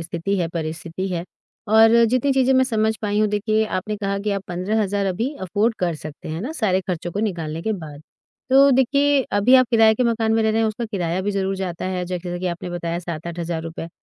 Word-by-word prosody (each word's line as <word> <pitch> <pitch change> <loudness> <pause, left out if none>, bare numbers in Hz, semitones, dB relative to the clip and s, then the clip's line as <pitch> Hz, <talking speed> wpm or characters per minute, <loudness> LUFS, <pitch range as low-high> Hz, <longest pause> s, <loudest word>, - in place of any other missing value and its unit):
स्थिति 170 +4 -2
है, 170 -2 0
परिस्थिति 165 +2 -4
है 175 -1 -3 0.4
और 225 +2 +6
जितनी 255 +4 +2
चीज़ें 265 0 +3
मैं 260 0 +4
समझ 220 -3 0
पाई 205 0 0
हूँ 215 - +3
देखिए, 215 +1 +1
आपने 210 +1 -3
कहा 200 -1 -2
कि 210 +1 -2
आप 195 -1 -2
15 185 +5 -1
हज़ार 200 0 -1
अभी 225 +9 -1
अफोर्ड 210 +5 0
कर 175 -2 0
सकते 155 0 -9
हैं, 155 - -4
है 165 - -4
ना? 285 +7 -4
सारे 195 - +1
खर्चों 175 -2 -4
को 205 - -2
निकालने 165 -6 -3
के 220 - -1
बाद। 155 -6 -8 0.5
तो 275 +1 +7
देखिए, 280 +2 +3
अभी 205 +6 +4
आप 255 -1 +6
किराए 225 -1 +5
के 250 - 0
मकान 225 -1 +1
में 225 - +2
रह 220 - +2
रहे 225 +1 +1
हैं 220 - +2
उसका 225 +2 -4
किराया 185 -4 -2
भी 205 - -1
ज़रूर 195 -1 -1
जाता 180 -3 -4
है 180 -1 -2
जैसे 175 0 -4
कि 185 - -3
आपने 175 0 -4
बताया 170 -1 -3
7-8 170 0 -6
हज़ार 170 -1 -3
रुपए, 165 0 -6
200 Hz, 235 wpm, -22 LUFS, 175-220 Hz, 0.5 s, तो